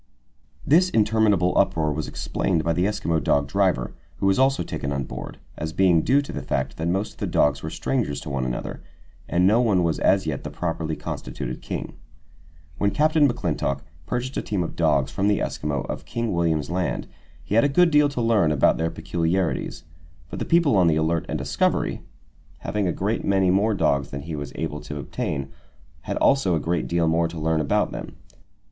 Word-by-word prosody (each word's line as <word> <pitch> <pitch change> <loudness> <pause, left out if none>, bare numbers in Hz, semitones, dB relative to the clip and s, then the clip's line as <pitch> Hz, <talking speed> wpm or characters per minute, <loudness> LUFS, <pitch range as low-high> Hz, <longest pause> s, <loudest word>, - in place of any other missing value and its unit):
This 175 +5 +4
interminable 105 - +2
uproar 80 -2 +2
was 75 +1 -3
explained 85 -4 -1
by 85 +1 +1
the 90 +2 +1
Eskimo 85 -6 0
dog 70 0 +2
driver, 90 -7 +1 0.2
who - - -2
was 95 +4 +3
also 135 +1 +3
taken 70 - -4
on 70 -1 -1
board, - - -7 0.2
as 80 +1 -4
being 90 -3 +4
due 140 - +3
to - - -7
the - - -4
fact 65 0 -2
that 80 - -2
most 95 +4 -1
of - - -26
the - - -2
dogs 75 0 +2
were 80 - -4
strangers 115 - -2
to - - -7
one 70 -2 -1
another, 60 -1 -4 0.5
and 90 +1 +2
no 110 +5 +5
one 100 -7 +2
was 80 -2 0
as 95 -2 +3
yet 75 -4 -3
the - - -5
properly 80 -2 -3
constituted 65 -4 -6
king. - - -5 0.9
When 100 - +3
Captain 155 +3 +3
McClintock 70 - -2 0.3
purchased 125 +8 -3
a - - 0
team 100 -4 -1
of 80 - -6
dogs 70 -5 +2
from 95 - 0
the 105 -1 +3
Eskimo 75 -3 -2
of - - -6
King 115 -3 -2
William's 85 -3 0
Land, 90 -1 -1 0.4
he - - -5
had 115 - +5
a 140 - +3
good 170 +4 +4
deal 150 -1 +5
to 140 -4 -3
learn 110 -9 +3
about 70 -3 +3
their 80 0 0
peculiarities; 85 +2 -2 0.5
but - - -5
the - - -2
people 165 -7 +3
on 90 -2 +5
the 80 - +3
Alert 80 +1 0
and - - -2
the - - -4
Discovery, - - 0 0.6
having 105 -3 -1
a - - +1
great 105 +6 -2
many 95 -2 +3
more 105 +3 +2
dogs 70 -7 +1
than 70 - -5
he 80 +2 -6
was 70 -1 -5
able 75 -2 -4
to 75 - -7
obtain, 70 0 -4 0.6
had - - -2
also 135 -11 +3
a - - +1
great 85 +3 -1
deal 85 -1 +1
more 80 +1 +2
to 85 0 -9
learn 80 0 +1
about 70 - +1
them. - - -7
85 Hz, 205 wpm, -24 LUFS, 75-105 Hz, 0.9 s, no